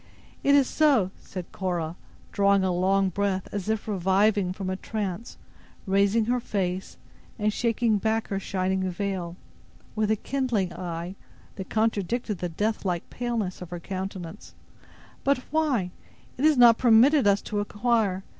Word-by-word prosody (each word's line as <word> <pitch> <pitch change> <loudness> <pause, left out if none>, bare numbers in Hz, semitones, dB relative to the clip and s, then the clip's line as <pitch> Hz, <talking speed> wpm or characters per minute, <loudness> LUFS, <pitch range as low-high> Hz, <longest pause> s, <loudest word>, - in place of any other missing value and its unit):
"It 280 0 +5
is 275 -3 +4
so," 270 -12 +3
said 180 -2 -8
Cora, 175 -4 -3 0.4
drawing 200 -1 +3
a 185 - +1
long 190 +2 +2
breath, 190 0 -1
as 205 0 -4
if 220 -1 -1
reviving 195 0 +2
from 190 0 -5
a 185 - -1
trance, 205 +1 -5 0.5
raising 200 +3 +2
her 245 +2 +1
face, 190 -4 -3 0.4
and 210 -1 0
shaking 230 -2 +1
back 220 +1 -1
her 195 - -1
shining 190 -1 -1
veil, 180 -2 -3 0.6
with 215 -1 0
a 220 - +3
kindling 235 -6 -1
eye, 175 0 -5 0.4
that 190 - -7
contradicted 220 -1 -1
the 180 - -2
death 210 +7 -2
like 175 -3 -3
paleness 230 -7 -3
of 180 - -7
her 175 -1 -5
countenance; 185 -2 -7 0.7
"but 280 0 +3
why—it 265 - -3
is 310 -3 +5
not 235 -2 +7
permitted 250 +2 +5
us 200 0 +4
to 210 - -3
inquire. 205 -2 0
200 Hz, 145 wpm, -26 LUFS, 185-225 Hz, 0.7 s, not